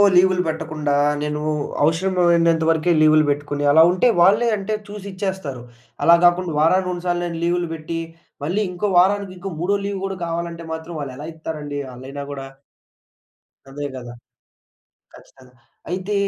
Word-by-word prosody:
లీవులు 185 0 +5
పెట్టకుండా, 155 -2 -2 0.3
నేను 150 0 -2 0.4
అవసరమైనంత 170 0 +3
వరకే 165 +2 +1
లీవులు 155 0 +5
పెట్టుకొని, 145 0 -3
అలా 160 +2 +7
ఉంటే 185 +7 +2
వాళ్ళే 205 +7 +5
అంటే 200 +2 -2
చూసి 205 -1 -8
ఇచ్చేస్తారు. 185 -9 -4 0.4
అలా 170 - +8
కాకుండా 175 -1 +2
వారానికి, 180 +4 +3
రెండు 175 0 -6
సార్లు 175 0 0
నేను 170 -1 -4
లీవులు 175 0 0
పెట్టి, 165 +1 -5 0.5
మళ్ళీ 185 +7 0
ఇంకో 180 +3 -2
వారానికి 195 +1 +2
ఇంకో 195 +2 -6
మూడో 195 +4 +1
లీవ్ 200 -1 -3
కూడా, 195 -1 -4
కావాలంటే 170 0 -4
మాత్రం 160 +1 -7
వాళ్ళు 135 -2 -6
ఎలా 150 +3 -7
ఇత్తారండి, 150 -3 -5
ఆళ్ళైన 135 +3 -7
కూడా. 135 -1 -7 1.2
అదే 145 +2 -6
కదా! 120 -2 -8 1.0
ఖచ్చితంగా. 130 -1 -18 0.4
అయితే 185 +3 -2
170 Hz, 145 wpm, -21 LUFS, 150-185 Hz, 1.2 s, అలా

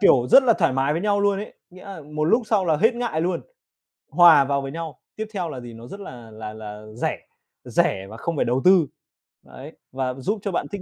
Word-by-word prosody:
kiểu 130 -11 +5
rất 270 - +8
là 240 -3 +4
thoải 165 -6 +2
mái 135 +3 +1
với 165 +4 -2
nhau 205 -1 +1
luôn 200 -1 +2
ấy. 210 - -8 0.2
Nghĩa 185 +1 -14
là 195 -4 -8
một 150 +1 -4
lúc 230 +9 +3
sau 205 -4 +1
là 160 -3 +2
hết 225 +9 +3
ngại 235 -10 -2
luôn, 175 +1 -1 0.7
hòa 165 -5 +7
vào 140 0 0
với 135 0 -6
nhau. 165 -1 -7 0.2
Tiếp 220 0 -5
theo 180 -4 -3
là 130 - -6
gì, 120 -1 -10
nó 115 +2 -11
rất 200 - -9
là 120 - -10
là 110 0 -8
là 105 -1 -9
rẻ, 115 - -2 0.5
rẻ 95 0 0
và 110 - -10
không 170 +6 -3
phải - - 0
đầu 125 +3 0
tư, 180 -5 +6 0.6
đấy, - - -11 0.2
và 130 -1 -2
giúp 195 - -3
cho 200 - -3
bạn 175 - -2
thích 200 -2 -5
160 Hz, 245 wpm, -23 LUFS, 130-200 Hz, 0.7 s, rất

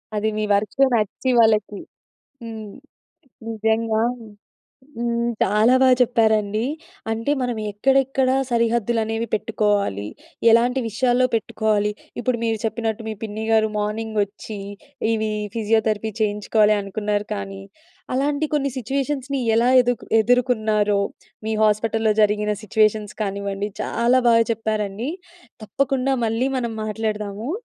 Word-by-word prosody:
అది 215 +1 0
మీ 215 - -1
వర్క్‌లో 210 +7 +2
నచ్చి 215 +4 -1
వాళ్ళకి 215 -3 +3 0.6
హ్మ్. 220 -3 -7 0.8
నిజంగా. 220 0 0 1.0
హ్మ్. 235 0 0
చాలా 215 +5 +4
బా 260 - +6
చెప్పారండి. 220 -3 +2 0.5
అంటే 225 +5 -2
మనం 245 -2 -1 0.2
ఎక్కడెక్కడ 270 +4 +2 0.2
సరిహద్దులు 235 -1 +1
అనేవి 225 +1 -2
పెట్టుకోవాలి, 205 - 0 0.4
ఎలాంటి 245 +3 +4
విషయాల్లో 250 +2 +2
పెట్టుకోవాలి. 210 -2 0 0.3
ఇప్పుడు 245 +1 0
మీరు 225 -1 0
చెప్పినట్టు 225 0 -2
మీ 220 - -3
పిన్ని 220 0 -4
గారు 220 -1 +4
మార్నింగ్ 215 +1 -3
వచ్చి 205 +1 -9 0.5
ఇవి 220 -1 -1 0.3
ఫిజియోథెరపీ 220 -1 0
చేయించుకోవాలి 210 0 +2
అనుకున్నారు 205 +1 -2
కానీ, 195 -1 -6 0.5
అలాంటి 285 +3 0
కొన్ని 280 -2 +1
సిట్యుయేషన్స్‌ని 270 +2 -2 0.2
ఎలా 235 +2 +3
ఎదు 245 0 +1 0.3
ఎదుర్కొన్నారో! 215 -4 +2 0.5
మీ 220 - 0
హాస్పిటల్లో 220 +1 +2
జరిగిన 210 0 +1
సిట్యుయేషన్స్ 215 0 +1
కానివ్వండి. 200 0 -3
చాలా 240 +2 +2
బాగా 230 -1 +5
చెప్పారండి. 215 +2 -2 0.5
తప్పకుండా 270 +4 0
మళ్ళీ 230 +4 0
మనం 235 -2 -3
మాట్లాడదాము. 215 +1 -3
220 Hz, 110 wpm, -22 LUFS, 210-235 Hz, 1.0 s, బా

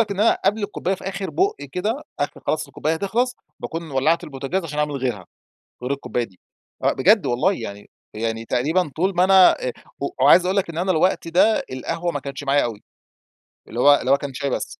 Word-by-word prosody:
لك 220 -2 +1
إن 200 0 -2
أنا 230 - +4
قبْل 210 +1 +2
الكوباية 195 -2 -2
في - - -12
آخر 195 0 -4
بُق 395 +3 +1 0.2
كده، 215 +10 -2 0.2
آخر 145 - -2
خلاص 155 -1 0
الكوباية 150 +3 -2
هتخلَص، 235 +8 -1 0.2
باكون 165 -1 -5
ولَّعت 145 +5 +1
البوتاجاز 145 +6 -3
عشان 150 -2 -5
أعمل 150 0 0
غِيرها، 120 -8 -3 0.6
غير 125 - -3
الكوباية 130 -3 -2
دي. 95 -5 -13 0.4
آآ - - +3
بجد 205 +10 +4
والله 125 +11 +2
يعني 100 - -8 0.2
يعني 115 +1 -3
تقريبًا 150 +9 +1
طول 185 +4 +1
ما 180 - +4
أنا 190 -5 +6
آآ 125 - -2 0.5
وعايز 170 +7 +7
أقول 190 +2 0
لك 195 - +1
إن 165 - -7
أنا 185 +2 +1
الوقت 175 +1 +1
ده، 185 +6 +3
القهوة 165 +7 -3
ما 145 - -3
كانتش 140 0 -7
معايا 140 +1 +3
أوي. 110 -3 -5 0.8
اللي 115 - -6
هو 145 +3 +7
اللي 130 - -1
هو 140 - +6
كان 140 -1 -6
شاي 140 +2 -2
بس. - - -4
160 Hz, 205 wpm, -22 LUFS, 135-190 Hz, 0.8 s, وعايز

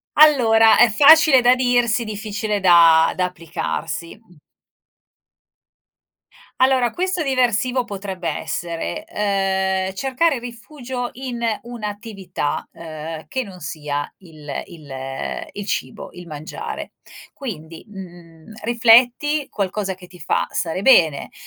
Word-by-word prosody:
Allora, 230 -7 +6
è 240 - +6
facile 290 +4 +7
da 245 +1 +5
dirsi, 245 -2 +1
difficile 210 -1 -3
da 170 -3 +5
da 180 - 0
applicarsi. 170 -1 -5
Mh. 180 -8 -24 2.2
Allora, 260 -3 +3
questo 365 0 -2
diversivo 255 -1 +1
potrebbe 190 -5 -5
essere: 170 - -4
ehm, 190 - -1
cercare 270 +5 0
rifugio 245 +1 -7
in 250 -2 -6 0.2
un'attività, 205 -8 -5
ehm, 160 -1 -8
che 260 -2 -3
non 190 -4 -12
sia 150 -2 -5
il 155 -6 -8
il 150 -5 -12 0.6
il 205 - -7
cibo, 130 -9 -4
il 180 0 -11
mangiare. 155 -1 -7 0.4
Quindi, 165 - -8
mhmm, 175 -3 -13
rifletti 245 +6 +3
qualcosa 195 -1 -3
che 180 -1 -15
ti 180 -1 -16
fa 155 - -1
stare 170 +2 -2
bene. 165 - +4
205 Hz, 110 wpm, -20 LUFS, 170-245 Hz, 2.2 s, facile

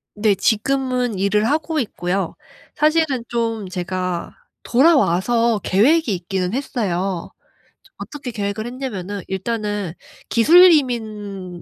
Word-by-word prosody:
네. 210 -1 +2
지금은 250 +1 0
일을 205 +2 +1
하고 310 +1 0
있고요. 185 -5 -2 0.4
사실은 305 -5 +1
좀 225 -4 -2
제가 180 -1 -4 0.3
돌아와서 235 - +3
계획이 250 - +3
있기는 185 +2 -3
했어요. 195 -9 -2 0.7
어떻게 275 -4 -7
계획을 205 0 -3
했냐면은 205 -7 -5
"일단은 205 -2 -3 0.4
기술 350 +10 +7
이민을 210 - -2
215 Hz, 250 characters per minute, -20 LUFS, 190-255 Hz, 0.7 s, 기술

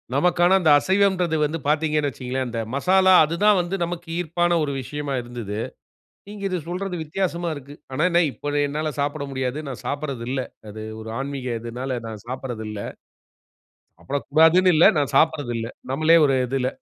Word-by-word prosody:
நமக்கான 175 +5 +4
அந்த 160 -4 +2
அசைவம்ன்றது 190 -2 +2
வந்து 160 +2 -3
பாத்தீங்கன்னு 150 -1 +1
வச்சிக்கோங்களேன், 130 +1 -4
அந்த 115 -1 -3
மசாலா 190 +6 +4
அது 165 +3 -4
தான் 210 -3 +6
வந்து 175 +3 -3
நமக்கு 170 -1 -6
ஈர்ப்பான 175 +1 +1
ஒரு 140 - -3
விஷயமா 145 +2 -4
இருந்தது. 115 -4 -6 0.7
நீங்க 205 -1 -8
இது 180 -1 -1
சொல்றது 180 0 -3
வித்தியாசமா 170 +1 -2
இருக்கு. 145 0 -10 0.2
ஆனா 155 +6 +1
என்ன, 175 0 +4
இப்போ 145 - -5
அத 145 0 +2
என்னால 155 +1 -2
சாப்பிட 145 0 -2
முடியாது. 130 +1 -2
நான் 130 - -8
சாப்பட்றது 140 -5 -3
இல்ல. 135 - -1 0.3
அது 110 +1 -8 0.2
ஒரு 110 0 -7
ஆன்மீக 130 -4 -3
இதுனால 125 +2 -4
நான் 110 -1 -8
சாப்பட்றது 125 -3 -5
இல்ல. 105 -1 -5 1.1
சாப்படக்கூடாதுனு 160 - +3
இல்ல, 160 - +6
நான் 145 -2 0
சாப்பட்றதில்ல. 135 -7 +1 0.2
நம்பளே 155 +4 +5
ஒரு 135 -2 +2
இதுல. 130 0 -1
145 Hz, 160 wpm, -23 LUFS, 130-170 Hz, 1.1 s, தான்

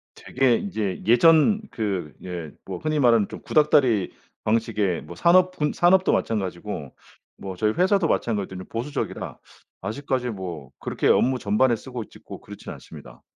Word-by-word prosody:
되게 130 -2 +1
인제 110 - -3
예전 165 - +5
그 95 -9 -3
예 85 -5 -6
뭐 - - -5
흔히 155 -1 -1
말하는 115 -5 +4
좀 - - -9
구닥다리 130 - +3 0.3
방식의 105 -5 0
뭐 85 +3 -10
산업군 180 -3 +3
산업도 185 +2 +4
마찬가지고 95 - -3 0.4
뭐 95 -1 -7
저희 105 +3 +1
회사도 185 -1 +2
마찬가지로 100 -8 -2
보수적이라 125 +6 -4 0.4
아직까지 125 +4 -2
뭐 90 - -7
그렇게 - - -2
업무 130 0 +3
전반에 115 +4 +2
쓰고 125 0 -7
있지 - - -16
고 - - -10
그렇진 - - -10
않습니다. - - -13
115 Hz, 335 characters per minute, -24 LUFS, 95-145 Hz, 0.4 s, 예전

